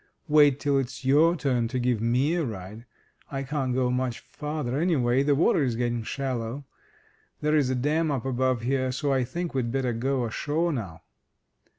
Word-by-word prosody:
Wait 145 -3 +5
till 140 -1 +2
it's 130 -1 -5
your 155 +6 +5
turn 130 -7 0
to 130 +3 -3
give 125 -3 0
me 125 +7 +2
a 175 -1 0
ride. 110 -1 -7 0.5
I 135 -1 -3
can't 135 -1 -2
go 125 0 +1
much 125 -1 -1
farther, 150 -3 -4
anyway, 135 -7 +2
the 140 0 +2
water 150 0 +3
is 125 -4 0
getting 120 0 -1
shallow. 130 +1 -4 0.7
There's 150 -3 +2
a 130 - 0
dam 155 +5 +1
up 135 -4 -2
above 130 -2 0
here, 130 +1 0
so 140 +2 -1
I 130 -1 +2
think 170 +7 -4
we'd 125 -3 -1
better 130 -2 0
go 130 +2 -1
ashore 155 +8 -1
now." 95 - -6
130 Hz, 180 wpm, -26 LUFS, 120-145 Hz, 0.7 s, Wait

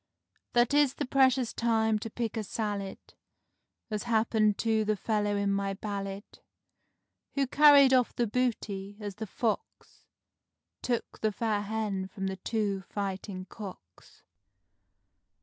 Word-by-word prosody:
That 240 +2 +3
is 290 -2 +4
the - - -2
precious 260 -2 +3
time 220 -2 +1
to 225 - -5
pick 230 0 -3
a 220 - -2
salad, 205 -2 -3 0.9
As 210 +1 -2
happened 220 -2 +2
to 220 -1 +1
the 215 0 +1
fellow 205 0 0
in 200 0 +1
my 195 0 -1
ballad; 200 -1 -4 1.1
Who 280 -1 +2
carried 280 -1 +7
off 250 -2 +3
the 240 - +1
booty, 205 -4 -2
as 205 -2 -6
the 220 0 -5
Fox 220 +2 -4 0.7
Took 240 -2 -2
the 215 - +1
fair 215 0 -1
Hen 205 -2 -2
from 195 0 -6
the 190 0 -3
two 200 0 -1
fighting 195 -1 -4
Cocks. 185 - -12
215 Hz, 130 wpm, -29 LUFS, 200-235 Hz, 1.1 s, carried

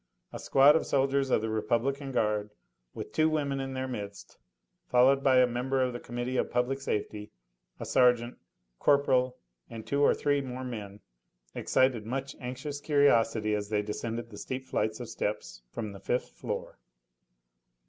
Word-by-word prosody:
A - - -6
squad 140 +2 +6
of 160 - 0
soldiers 135 0 +1
of 110 - +3
the 110 0 -2
Republican 120 +6 -1
Guard, 105 -3 0 0.5
with - - -6
two 155 0 +3
women 140 -3 -1
in 135 0 -4
their 130 0 -2
midst, 100 -5 -7
and - - -42
followed 135 +2 +4
by 130 -1 +5
a 125 - +7
member 125 +2 -1
of 125 -1 -1
the 120 - -5
Committee 120 +2 -4
of - - 0
Public 125 +3 0
Safety, 105 -3 -3 0.5
a - - -5
sergeant, 120 -1 +3 0.4
corporal 130 -3 +3 0.3
and 115 -1 -8
two 140 0 0
or 145 - +5
three 145 -1 +1
more 130 -1 -6
men, 105 -5 -7 0.5
excited 130 -4 +1
much 135 +3 -4
anxious 140 +3 -5
curiosity 115 -8 +3
as 105 -1 -2
they 105 -1 0
descended 115 +2 -4
the 105 - -9
steep 130 0 -5
flights 110 -3 -1
of 120 - -6
steps 105 - -4
from 110 - -5
the 100 - -10
fifth 125 +5 -1
floor. - - -6
125 Hz, 170 wpm, -29 LUFS, 110-135 Hz, 0.5 s, a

